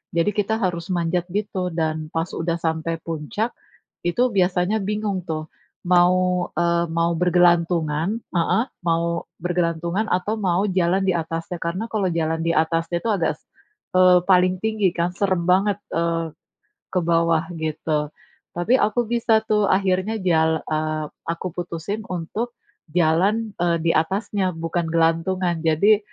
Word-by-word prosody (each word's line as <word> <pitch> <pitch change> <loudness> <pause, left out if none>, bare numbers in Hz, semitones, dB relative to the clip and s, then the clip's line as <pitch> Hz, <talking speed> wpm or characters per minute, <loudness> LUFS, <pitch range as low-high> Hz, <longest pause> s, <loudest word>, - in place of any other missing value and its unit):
Jadi 170 +5 +2
kita 210 +1 +1
harus 175 0 -2
manjat 170 +1 0
gitu 195 -3 -2
dan 155 -1 -2
pas 165 +1 0
udah 170 0 -1
sampai 160 0 -1
puncak 165 +8 -3 0.6
itu 175 +8 0 0.2
biasanya 180 +3 +2
bingung 210 -2 -2
tuh 155 0 -3 0.4
mau, 180 0 +3
eee, 170 0 +2
mau 170 +1 +1
bergelantungan 175 +1 +2 0.2
heeh, 175 +7 +2 0.2
mau 170 0 0 0.2
bergelantungan 175 +3 -1
atau 185 +5 0
mau 190 -2 +1
jalan 185 0 +2
di 185 - +3
atasnya. 165 +1 -3
Karena 180 +6 -2
kalau 200 -4 0
jalan 160 0 -1
di 165 - +1
atasnya 165 +2 +1
itu - - -4
agak 170 -4 +1
s - - -36 0.6
eee, 180 -1 +7
paling 185 0 +4
tinggi 215 -4 +2
kan, 170 +1 0
seram 185 -2 0
banget, 195 +2 +3 0.2
eee, 165 -1 -1 0.6
ke 185 - +3
bawah 165 -1 +2 0.2
gitu. 155 -1 -1 0.5
Tapi 175 +8 +1
aku 225 +3 +2
bisa 225 -2 +3
tuh 210 -2 +2
akhirnya 190 +2 +1
jal 160 -1 +3
eee, 155 0 -2 0.3
aku 170 +2 -4
putusin 175 +4 -4
untuk 185 +7 -4 0.4
jalan, 180 +7 +2
eee, 170 -1 +2
di 165 - +4
atasnya 190 +2 0
bukan 165 +1 -2
gelantungan. 170 +2 +1
Jadi 200 +7 +4
175 Hz, 140 wpm, -22 LUFS, 165-190 Hz, 0.6 s, eee